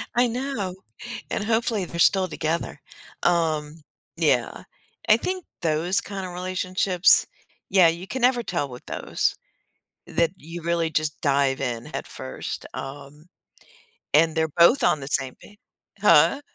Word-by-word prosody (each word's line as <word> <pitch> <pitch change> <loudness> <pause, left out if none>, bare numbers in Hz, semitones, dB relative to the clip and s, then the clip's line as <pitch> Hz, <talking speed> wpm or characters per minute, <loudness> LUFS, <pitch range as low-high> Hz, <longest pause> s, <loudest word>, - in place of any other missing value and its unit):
I 245 +1 +4
know, 235 -6 -3 0.6
and, - - -1
hopefully, 225 -2 0
they're 170 0 -7
still 190 +2 +4
together, 160 -2 -3 0.4
um, 160 -3 0 0.3
yeah, - - +1 0.5
I - - +7
think 370 -1 -3 0.2
those 165 +3 +1
kinda 195 -2 -6
relationships 185 0 +2 0.4
yeah, 185 -3 +6
you 170 +3 -5
can 260 +5 -4
never 245 -1 +3
tell 170 -9 -2
with 125 0 -11
those, - - -1 0.7
that 170 -1 +1
you 165 +2 -9
really 170 -1 0
just 155 -1 -1
dive 140 -2 +2
in 120 -3 -3
head - - -6
1st, 65 - -6
um, 145 +2 -9 0.9
and 160 +1 +4
they're 160 -1 +1
both 235 +11 +6
on 155 - +3
the 135 - -6
same 135 -2 -1
pa - - -14 0.5
Huh? 175 - +5
170 Hz, 140 wpm, -24 LUFS, 150-195 Hz, 0.9 s, I